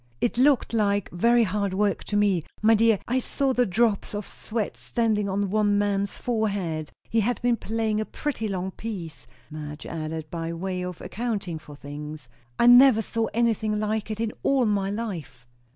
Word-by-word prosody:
"It 240 0 0
looked 270 -3 +3
like 205 -3 +1
very 235 +7 +4
hard 200 -1 -1
work, 205 0 +1
to 205 - -1
me. 200 -5 +2 0.2
My 220 +1 +5
dear, 225 -1 +4
I 255 +2 +1
saw 270 +1 0
the 245 -2 +2
drops 210 +1 +1
of 205 -1 -4
sweat 220 -2 -4
standing 215 -3 0
on 195 0 -1
one 205 -1 +3
man's 200 -1 0
forehead; 200 -10 -1 0.2
he 225 - +1
had 235 +3 0
been 245 -1 +3
playing 220 -1 -1
a - - -2
pretty 275 -5 -3
long 190 -1 -3
piece," 180 -9 -7 0.2
Madge 150 -1 -7
added, 160 -1 -4
by 165 -1 -3
way 180 +2 -3
of 180 -2 -6
accounting 200 -8 -3
for 150 -1 -12
things. 145 -1 -8 0.3
"I - - +3
never 245 -2 +8
saw 225 +1 -1
anything 220 -2 +1
like 215 0 -1
it, 215 0 -4
in 225 -1 -1
all 270 -3 +3
my 200 -2 +1
life!" 180 - -5
210 Hz, 180 wpm, -25 LUFS, 180-230 Hz, 0.3 s, never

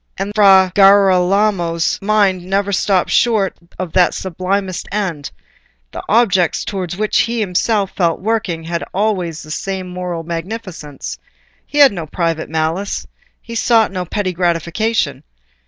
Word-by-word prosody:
And 195 +2 -3
Fra 195 -3 +5
Girolamo's 195 -3 +3
mind 200 -3 +2
never 195 +2 -1
stopped 195 -1 +1
short 220 -5 +2 0.2
of 185 -3 -5
that 180 -2 +3
sublimest 185 +1 -3
end: 180 -8 -3 0.6
the - - -6
objects 195 -7 +2
towards 180 -3 -4
which 215 0 +1
he 235 0 0
felt - - +1 0.5
himself - - -21 0.2
working 195 -5 -2
had 170 +1 -3
always 185 -6 -1
the 155 - -10
same 190 +2 -4
moral 180 -2 -5
magnificence. 170 -3 -6 0.5
He 295 - -6
had 285 -2 +7
no 170 -5 -6
private 165 0 -2
malice—he 165 +8 -4
sought 230 -2 +3
no 185 -2 -3
petty 185 +1 -2
gratification. 175 +6 -1
190 Hz, 130 wpm, -17 LUFS, 170-205 Hz, 0.6 s, had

